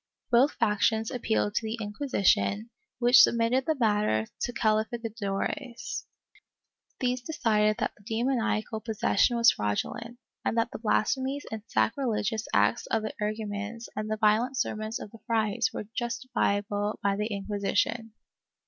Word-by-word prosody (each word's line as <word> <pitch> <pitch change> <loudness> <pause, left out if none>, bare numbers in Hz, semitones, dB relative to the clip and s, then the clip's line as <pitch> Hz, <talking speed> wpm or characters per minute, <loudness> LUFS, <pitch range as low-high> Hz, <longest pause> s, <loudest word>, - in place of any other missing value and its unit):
Both 250 +5 +5
factions 220 0 +1
appealed 110 - 0
to - - +1
the 220 +1 -3
Inquisition, 210 -1 +1 0.3
which 245 +1 +7
submitted 235 +3 +3
the 315 - +2
matter 210 - +2 0.2
to - - -1
calificadores. 225 - -2 0.9
These 250 0 0
decided 215 -7 +1
that - - -1
the 205 - -22
demoniacal 225 -2 0
possession 230 +2 +1
was 230 0 +7
fraudulent, 230 - -3 0.3
and 230 - -1
that 230 - +1
the - - -6
blasphemies 260 +5 0
and 220 -1 -4
sacrilegious 220 -3 0
acts 105 +3 +2
of 220 -1 0
the 215 - -4
energumens 210 +1 -4
and 215 0 -3
the 215 - -1
violent 225 +5 +2
sermons 215 -3 -2
of 205 - -8
the 225 - -13
frailes 220 -1 +1
were - - -5
justiciable 210 -3 -1
by 200 -1 +2
the 210 +1 -1
Inquisition. 205 +2 -1
220 Hz, 135 wpm, -28 LUFS, 210-240 Hz, 0.9 s, which